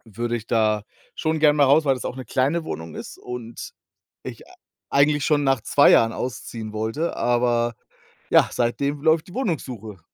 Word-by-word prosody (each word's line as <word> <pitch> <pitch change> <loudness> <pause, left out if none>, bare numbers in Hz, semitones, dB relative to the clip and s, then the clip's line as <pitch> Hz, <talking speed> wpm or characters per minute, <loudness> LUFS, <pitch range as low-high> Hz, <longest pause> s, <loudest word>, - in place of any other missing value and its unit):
Würde 120 +1 -2
ich 115 0 -12
da 110 -2 +1 0.3
schon 160 0 -1
gern 150 -1 +5
mal 145 - +5
raus, 145 +4 +4
weil 135 -3 +2
das 125 - -7
auch - - -4
'ne 130 - -7
kleine 145 +6 0
Wohnung 80 - -7
ist - - -8
und 120 -2 -8 0.5
ich, - - -8
äh, - - -19 0.4
eigentlich 145 0 +3
schon 145 -2 +2
nach 135 -2 +2
2 145 - +5
Jahren 115 0 +4
ausziehen 115 -3 -6
wollte, 110 +10 -2
aber 120 -1 +1 0.5
ja, - - +5
seitdem 140 +4 -1
läuft 160 0 +2
die 180 - -13
Wohnungssuche. 125 - -4
130 Hz, 180 wpm, -23 LUFS, 115-145 Hz, 0.5 s, gern